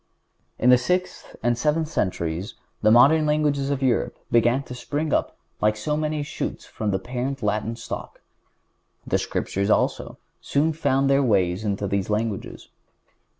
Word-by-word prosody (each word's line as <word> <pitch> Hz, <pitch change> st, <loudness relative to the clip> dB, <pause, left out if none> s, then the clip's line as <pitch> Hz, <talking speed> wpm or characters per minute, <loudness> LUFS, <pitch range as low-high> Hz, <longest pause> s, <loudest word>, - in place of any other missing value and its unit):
In 125 Hz, -, +4 dB
the 125 Hz, -, +7 dB
sixth 180 Hz, +7 st, -2 dB
and 120 Hz, +1 st, +2 dB
seventh 150 Hz, +5 st, 0 dB
centuries 90 Hz, -, -2 dB, 0.3 s
the 110 Hz, -, +4 dB
modern 145 Hz, +7 st, +6 dB
languages 145 Hz, -2 st, +1 dB
of 140 Hz, -1 st, -1 dB
Europe 125 Hz, -3 st, +1 dB
began 120 Hz, +3 st, +3 dB
to 125 Hz, -, -9 dB
spring 145 Hz, +4 st, -3 dB
up -, -, 0 dB, 0.2 s
like 105 Hz, 0 st, +2 dB
so 150 Hz, +8 st, -1 dB
many 155 Hz, -1 st, -1 dB
shoots 145 Hz, -, -5 dB
from 110 Hz, -, -4 dB
the 95 Hz, -, +1 dB
parent 125 Hz, +5 st, -4 dB
Latin 105 Hz, +2 st, -1 dB
stock. 115 Hz, -, -7 dB, 0.9 s
The -, -, +1 dB
Scriptures, 100 Hz, +2 st, -2 dB
also, -, -, 0 dB, 0.2 s
soon 155 Hz, +3 st, +1 dB
found 140 Hz, -3 st, +1 dB
their 140 Hz, 0 st, +4 dB
way 100 Hz, -9 st, +3 dB
into 100 Hz, +2 st, -2 dB
these 100 Hz, 0 st, -1 dB
languages. 105 Hz, -1 st, -3 dB
125 Hz, 150 wpm, -24 LUFS, 105-145 Hz, 0.9 s, the